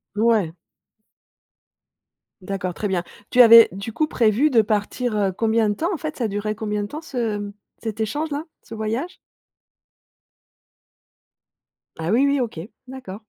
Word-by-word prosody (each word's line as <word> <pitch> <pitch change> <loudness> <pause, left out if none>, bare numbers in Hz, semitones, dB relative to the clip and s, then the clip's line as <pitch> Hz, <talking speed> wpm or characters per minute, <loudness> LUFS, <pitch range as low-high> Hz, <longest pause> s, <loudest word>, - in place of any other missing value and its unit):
Ouais. 215 -7 +2 1.9
D'accord, 185 -1 -4
très 210 - -2
bien. 185 -2 -1 0.3
Tu 250 - +6
avais 230 -1 +9
du 200 +5 -7
coup 310 - +1
prévu 235 +3 +2
de 230 - +5
partir, 215 +2 -1
heu, 195 -2 +1
combien 220 +2 +1
de 205 - +1
temps 335 - -1
en - - -2
fait? 310 0 -6
Ca 235 - 0
durait 205 +1 -3
combien 210 -2 -3
de 205 - -4
temps 305 +6 -7
ce 235 -8 -3
mmh 205 0 -6 0.3
cet 220 -1 -5
échange 290 +8 -2
là, 290 +2 -3 0.2
ce - - -11
voyage? 225 +10 -3 2.8
Ah, 165 +2 -2
oui, 250 +6 +4
oui, 280 0 +2
OK. 230 -10 -3 0.3
D'accord. 250 -6 -9
220 Hz, 155 wpm, -22 LUFS, 205-250 Hz, 2.8 s, avais